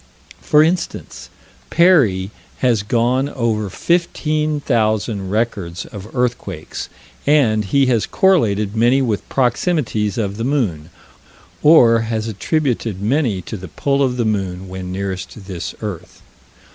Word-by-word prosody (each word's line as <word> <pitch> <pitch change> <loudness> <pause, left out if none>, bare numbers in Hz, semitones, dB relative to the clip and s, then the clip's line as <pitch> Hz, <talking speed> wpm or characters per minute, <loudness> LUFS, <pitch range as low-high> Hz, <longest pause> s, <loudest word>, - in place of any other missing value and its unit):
For 150 0 +4
instance, 175 +3 -3 0.4
Perrey 125 - +3 0.3
has 120 -5 +2
gone 120 +5 +1
over 110 -6 -1
15,000 140 - 0
records 100 -5 -2
of 105 +3 -10
earthquakes, 115 -10 -3 0.4
and 115 -8 +3
he 135 +8 +3
has 120 -4 +1
correlated 110 - +2
many 120 +4 +3
with 110 -5 -2
proximities 120 - 0
of 100 -3 -2
the 115 - -3
moon, 105 - -1 0.7
or 120 -7 +6
has 110 -1 -2
attributed 115 - -1
many 110 - 0
to 110 - -6
the 95 -2 -8
pull 140 - -1
of 125 -2 +1
the 120 - 0
moon 95 -3 -2
when 95 -1 -6
nearest 95 +1 -5
this 95 -3 -6
earth. 100 -6 -7
115 Hz, 120 wpm, -19 LUFS, 100-135 Hz, 0.7 s, or